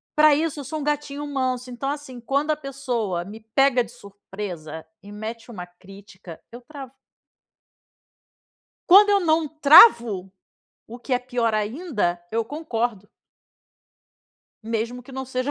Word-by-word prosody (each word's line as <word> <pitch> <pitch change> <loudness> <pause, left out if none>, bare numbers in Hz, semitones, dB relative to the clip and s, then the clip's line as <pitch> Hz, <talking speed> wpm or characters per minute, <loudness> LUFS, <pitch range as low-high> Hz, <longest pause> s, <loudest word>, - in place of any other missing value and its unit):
Pra 300 -1 +6
isso, 310 0 -2
eu 280 - -7
sou 310 +4 -5
um - - -5
gatinho 295 0 -3
manso, 255 -3 -3
então 260 +3 -4
assim, 285 -3 -6
quando 280 +5 -1
a - - +1
pessoa 250 - -3
me 205 +5 -10 0.2
pega 270 -2 +4
de 230 - -13
surpresa 195 -7 -9 0.2
e 205 - -13
mete 225 +2 -7
uma 185 -6 -8
crítica, 185 -1 -14
eu 240 - -10
travo. 270 0 -11 2.0
Quando 405 +3 +7
eu 400 -1 +4
não 320 -2 +1
travo, 260 - +6 0.6
o 235 +2 -10
que 255 +2 -7
é 250 - +3
pior 245 -3 -1
ainda, 210 - -2
eu 225 +1 -1
concordo. 235 - -4 1.5
Mesmo 230 +2 -4
que 250 - -15
não 265 0 -5
seja 255 +1 -3
245 Hz, 145 wpm, -23 LUFS, 210-285 Hz, 2.0 s, Quando